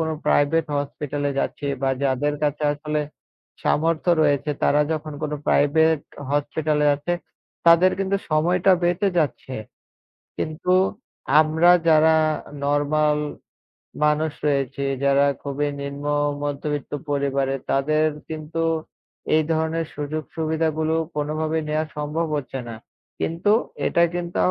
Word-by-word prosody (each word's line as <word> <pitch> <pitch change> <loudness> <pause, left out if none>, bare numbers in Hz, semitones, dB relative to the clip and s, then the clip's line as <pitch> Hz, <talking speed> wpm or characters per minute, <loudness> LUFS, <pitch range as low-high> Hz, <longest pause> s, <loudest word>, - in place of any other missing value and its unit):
কোনো 160 -1 0
প্রাইভেট 155 +3 +3
হসপিটালে 145 0 -3
যাচ্ছি 145 - -2 0.2
বা 135 - +2
যাদের 140 +2 +1
কাছে 150 0 0
আসলে, 150 +1 -2 0.6
সামর্থ্য 165 +2 +1
রয়েছে 145 0 +1
তারা 150 - +4
যখন 155 -1 -4
কোনো 150 0 -2
প্রাইভেট 160 +2 +3 0.3
হসপিটালে 150 +1 0
আছে 175 +5 -3 0.5
তাদের 170 +2 +6
কিন্তু 195 0 0
সময়টা 175 +5 +3
বেঁচে 175 +3 +2
যাচ্ছে। 140 -4 -1 0.8
কিন্তু, 160 +4 -1 0.7
আমরা 160 +3 +4 0.2
যারা 160 0 +5 0.5
নরমাল 150 +1 +2 0.9
মানুষ 150 +1 +2 0.2
রয়েছি 140 -1 0 0.2
যারা 140 +1 +4 0.2
খুবই 145 +1 -1
নিম্ন 140 +1 -6 0.4
মধ্যবিত্ত 145 0 -3 0.2
পরিবারে 140 -1 0 0.2
তাদের 155 +3 +2 0.2
কিন্তু, 160 +1 -3 0.7
এই 155 - +4
ধরনের 160 +1 -1
সুযোগ-সুবিধাগুলো 155 +1 -1 0.2
কোনোভাবেই 155 +1 -1
নেয়া 155 +1 0
সম্ভব 155 +3 -1
হচ্ছে 135 -1 -5
না। 115 - -6 0.5
কিন্তু, 170 +6 +1 0.4
এটা 170 - +3
কিন্তু 175 0 -4
155 Hz, 110 wpm, -23 LUFS, 145-160 Hz, 0.9 s, তাদের